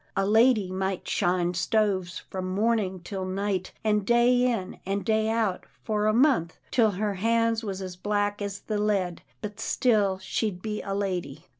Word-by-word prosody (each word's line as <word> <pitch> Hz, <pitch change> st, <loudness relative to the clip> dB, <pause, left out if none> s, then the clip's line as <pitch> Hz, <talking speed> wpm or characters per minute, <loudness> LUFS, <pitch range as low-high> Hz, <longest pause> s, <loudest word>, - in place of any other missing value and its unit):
" -, -, -12 dB
A 195 Hz, -, +2 dB
lady 220 Hz, -2 st, +4 dB
might 190 Hz, 0 st, -2 dB
shine 175 Hz, 0 st, +1 dB
stoves 185 Hz, -1 st, 0 dB
from 185 Hz, -1 st, -4 dB
morning 200 Hz, -2 st, 0 dB
till 190 Hz, 0 st, -4 dB
night, 190 Hz, 0 st, -2 dB
and 210 Hz, -1 st, +2 dB
day 240 Hz, +3 st, +4 dB
in 195 Hz, -6 st, -4 dB
and 195 Hz, +1 st, -2 dB
day 220 Hz, -1 st, +2 dB
out 220 Hz, -4 st, -1 dB, 0.2 s
for 210 Hz, -1 st, 0 dB
a -, -, +4 dB
month, 235 Hz, -, +2 dB
till 230 Hz, -3 st, +4 dB
her 205 Hz, +2 st, -1 dB
hands 230 Hz, +3 st, +1 dB
was 195 Hz, -2 st, -4 dB
as 185 Hz, -1 st, -6 dB
black 205 Hz, +1 st, -1 dB
as 200 Hz, 0 st, -4 dB
the 215 Hz, -1 st, -2 dB
lead, 195 Hz, -4 st, 0 dB, 0.2 s
but 210 Hz, 0 st, -6 dB
still 215 Hz, -6 st, +2 dB
she'd 190 Hz, 0 st, -2 dB
be 210 Hz, -1 st, -3 dB
a 195 Hz, -1 st, -3 dB
lady." 180 Hz, -6 st, -3 dB
205 Hz, 175 wpm, -27 LUFS, 185-220 Hz, 0.2 s, lady